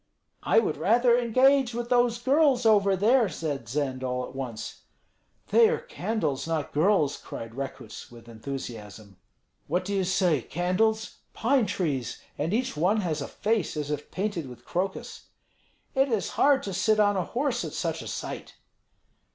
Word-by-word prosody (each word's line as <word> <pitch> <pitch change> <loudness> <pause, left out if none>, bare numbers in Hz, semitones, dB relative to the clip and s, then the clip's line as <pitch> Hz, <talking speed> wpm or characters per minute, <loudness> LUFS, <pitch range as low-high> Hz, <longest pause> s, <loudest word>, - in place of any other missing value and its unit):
"I - - +2
would 215 -9 +2
rather 235 - +4
engage 255 +1 +3
with 240 0 -4
those 245 -1 +3
girls 265 0 +3
over 200 -3 +4
there," 225 +3 +3
said 145 -8 -4
Zend, 130 -1 -2
all 125 0 -2
at - - -11
once. 130 -5 -6 0.7
"They 460 -1 +6
are 470 - +1
candles, 220 - -3
not 160 -4 -2
girls!" 155 -2 +2
cried 115 0 -8
Rekuts, 135 -4 -7
with 115 -1 -15
enthusiasm. 110 -5 -8 0.5
"What 180 +5 -1
do 200 - -3
you 195 -1 +1
say, 180 -6 +2
candles? 190 - 0 0.2
Pine 240 -1 +2
trees! 145 - -2 0.2
And 155 +4 -2
each 245 +1 -1
one 185 +8 +2
has 160 -5 -2
a 140 - -4
face 215 -7 -1
as 150 -1 -3
if 150 0 -4
painted 185 -7 -3
with 120 -1 -13
crocus." 190 +2 -4 0.7
"It 270 0 +2
is 225 -5 0
hard 280 -1 +3
to 195 - -4
sit 215 +4 +2
on 205 -1 +4
a 185 - 0
horse 245 - -1
at - - -6
such - - -2
a - - -8
sight." - - -6
190 Hz, 165 wpm, -27 LUFS, 140-235 Hz, 0.7 s, They